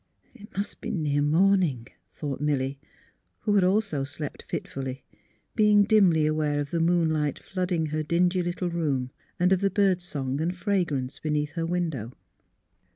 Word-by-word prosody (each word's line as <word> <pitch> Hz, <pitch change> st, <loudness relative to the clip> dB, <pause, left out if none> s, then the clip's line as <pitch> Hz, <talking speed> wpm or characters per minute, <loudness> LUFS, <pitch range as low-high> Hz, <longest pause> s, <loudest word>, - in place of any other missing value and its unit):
" -, -, -42 dB
It 210 Hz, -4 st, -14 dB
must 200 Hz, -, -3 dB
be -, -, -4 dB
near 145 Hz, -4 st, 0 dB
morning," 160 Hz, -5 st, +2 dB, 0.2 s
thought 140 Hz, -3 st, -5 dB
Milly, 140 Hz, -2 st, 0 dB, 0.6 s
who 205 Hz, -3 st, +3 dB
also 195 Hz, -4 st, +1 dB
had 135 Hz, -, -2 dB
slept 145 Hz, 0 st, -6 dB
fitfully, 135 Hz, -1 st, -5 dB, 0.5 s
being 210 Hz, -2 st, +5 dB
dimly 195 Hz, -7 st, +4 dB
aware 155 Hz, -1 st, +1 dB
of 145 Hz, -1 st, -4 dB
the 170 Hz, -, 0 dB
moonlight 160 Hz, -4 st, +1 dB
flooding 180 Hz, -3 st, -2 dB
her 155 Hz, 0 st, -2 dB
dingy 175 Hz, +3 st, +2 dB
little 175 Hz, 0 st, -2 dB
room 140 Hz, -7 st, -1 dB, 0.3 s
and 180 Hz, +2 st, +4 dB
of 190 Hz, -, +1 dB
the 200 Hz, -, +3 dB
bird 195 Hz, -3 st, +2 dB
song 140 Hz, -4 st, -3 dB
and 175 Hz, +3 st, -1 dB
fragrance 170 Hz, -10 st, -1 dB
beneath 150 Hz, -1 st, -1 dB
her 165 Hz, -1 st, -2 dB
window. 160 Hz, -10 st, -2 dB
165 Hz, 155 wpm, -26 LUFS, 145-185 Hz, 0.6 s, being